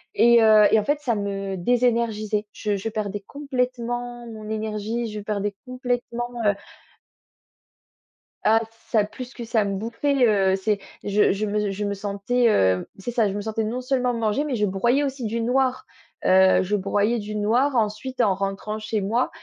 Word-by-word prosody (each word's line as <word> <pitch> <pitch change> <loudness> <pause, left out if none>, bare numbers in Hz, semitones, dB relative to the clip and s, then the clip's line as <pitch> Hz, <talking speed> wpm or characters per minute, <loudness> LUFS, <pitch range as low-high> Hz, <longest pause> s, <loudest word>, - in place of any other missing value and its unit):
Et 235 0 +6
heu, 215 -1 +7
et 220 - +5
en 210 - -3
fait, 290 +1 +1
ça 255 -6 0
me 195 -1 -3
désénergisait. 225 -1 +1
Je 210 -2 -2
je 200 +3 -3
perdais 205 -2 -3
complètement 245 -3 -3
mon 215 -2 -9
énergie, 220 +2 -2
je 210 - -5
perdais 205 -1 -3
complètement, 245 -1 -3 0.2
heu 205 - +4 1.9
Ah 220 +1 +5 0.3
ça 215 -2 +3
plus 250 +4 -9
que 235 - -7
ça 225 -1 +1
me 200 -1 -2
bouffait, 250 +5 +1
heu, 195 -3 +3
c'est 205 +1 0 0.2
je 205 +1 +3
je 200 +2 -1
me 210 -1 -1
je 205 +2 -3
me 200 - -1
sentais 200 +5 0
heu, 95 - +3
c'est 195 +5 -5
ça, 225 -3 +2
je - - -4
me 205 - -3
sentais 220 +1 -2
non 225 +4 -2
seulement 255 -1 0
manger 230 +3 0
mais 290 -4 -2
je 210 -2 +1
broyais 235 +8 +1
aussi 270 -3 -3
du 225 +2 -2
noir. 255 +2 +1 0.4
Heu, 190 0 +5
je 195 +3 0
broyais 205 +4 +1
du 210 0 -6
noir 240 +7 +2
ensuite 225 +3 -1
en 205 -4 +3
rentrant 200 +2 -3
chez 215 0 -2
moi. 230 +6 0
220 Hz, 180 wpm, -24 LUFS, 205-245 Hz, 1.9 s, heu